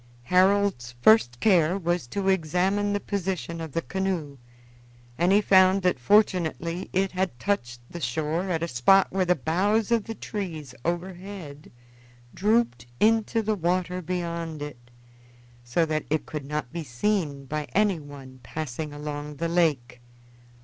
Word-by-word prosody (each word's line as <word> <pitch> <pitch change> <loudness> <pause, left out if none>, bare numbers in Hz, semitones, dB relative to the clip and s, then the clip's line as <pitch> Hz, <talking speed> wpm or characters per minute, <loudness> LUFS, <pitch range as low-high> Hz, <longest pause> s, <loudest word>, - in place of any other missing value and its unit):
Harold's 185 -6 +2
first 125 - +5
care 180 -4 +3
was 175 -6 -1
to 195 +9 -3
examine 190 +3 +1
the 205 - 0
position 180 - -3
of 160 -4 -7
the 165 - -1
canoe, 180 -8 -3 0.8
and 175 +6 +2
he 205 +2 +5
found 190 -1 +5
that 180 -7 +2
fortunately 175 - +1
it 195 0 +1
had 185 -7 -2
touched 125 -12 -2
the 170 - -8
shore 155 +7 -1
at 165 -2 -1
a - - -1
spot 170 +10 +4
where 190 0 +1
the 180 0 +3
boughs 200 - +1
of 230 -3 +2
the 225 - -6
trees 165 - -6
overhead 175 -3 -5 0.6
drooped 210 - +1
into 225 +1 +2
the 215 +1 +1
water 180 0 -1
beyond 170 -2 -4
it, 120 -5 -10 0.7
so 125 +8 +1
that 155 -1 -2
it 155 +1 0
could 150 -3 -6
not 150 -2 -4
be 170 -1 -4
seen 145 - -1
by 150 +2 -3
anyone 145 -10 -1
passing 155 +1 -5
along 145 0 -6
the 165 +4 -2
lake. 150 -8 0
170 Hz, 145 wpm, -26 LUFS, 150-195 Hz, 0.8 s, first